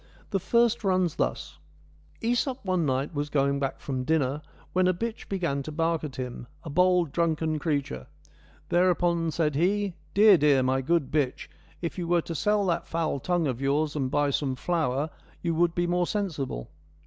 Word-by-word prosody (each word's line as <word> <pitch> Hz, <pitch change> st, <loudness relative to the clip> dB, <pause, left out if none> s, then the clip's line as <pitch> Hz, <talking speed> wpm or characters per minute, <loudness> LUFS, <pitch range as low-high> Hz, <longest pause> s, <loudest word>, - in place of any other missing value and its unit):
The 195 Hz, -, +1 dB
first 235 Hz, +4 st, +2 dB
runs 185 Hz, -4 st, +1 dB
thus: 75 Hz, +5 st, -2 dB, 0.6 s
JEsop 245 Hz, +1 st, 0 dB
one 180 Hz, -4 st, +1 dB
night 135 Hz, +4 st, -1 dB
was 145 Hz, 0 st, -2 dB
going 140 Hz, -1 st, +1 dB
back 135 Hz, -1 st, -2 dB
from 130 Hz, -2 st, -3 dB
dinner, 145 Hz, -1 st, 0 dB, 0.3 s
when 185 Hz, 0 st, +3 dB
a 185 Hz, -, +2 dB
bitch 230 Hz, +4 st, -5 dB
began 170 Hz, -8 st, -1 dB
to 155 Hz, -, -6 dB
bark 165 Hz, +1 st, 0 dB
at 145 Hz, -4 st, -5 dB
him, 125 Hz, -1 st, -6 dB, 0.2 s
a 155 Hz, -, -6 dB
bold, 180 Hz, -1 st, +3 dB
drunken 160 Hz, -1 st, 0 dB
creature. 140 Hz, -, -2 dB, 0.6 s
Thereupon 175 Hz, -2 st, +2 dB
said 155 Hz, -1 st, 0 dB
he: 195 Hz, +5 st, +1 dB
' -, -, -32 dB
Dear, 205 Hz, -3 st, +7 dB
dear! 140 Hz, -3 st, +4 dB
my 130 Hz, +1 st, +1 dB
good 155 Hz, 0 st, 0 dB
bitch, 145 Hz, -4 st, -1 dB, 0.3 s
if 170 Hz, +2 st, -3 dB
you 175 Hz, -, -3 dB
were'to'sell 175 Hz, +4 st, +1 dB
that 170 Hz, -3 st, -1 dB
foul 165 Hz, -4 st, -1 dB
tongue 175 Hz, +2 st, 0 dB
of 130 Hz, -3 st, -2 dB
yours 145 Hz, +2 st, +1 dB
and 135 Hz, -3 st, -1 dB
buy 145 Hz, +1 st, +1 dB
some 135 Hz, -1 st, -1 dB
flour, 150 Hz, -1 st, -1 dB, 0.3 s
you 170 Hz, -1 st, 0 dB
would|be 175 Hz, +1 st, +1 dB
more 175 Hz, 0 st, +1 dB
sensible.' 150 Hz, -, -3 dB
160 Hz, 170 wpm, -27 LUFS, 140-180 Hz, 0.6 s, Dear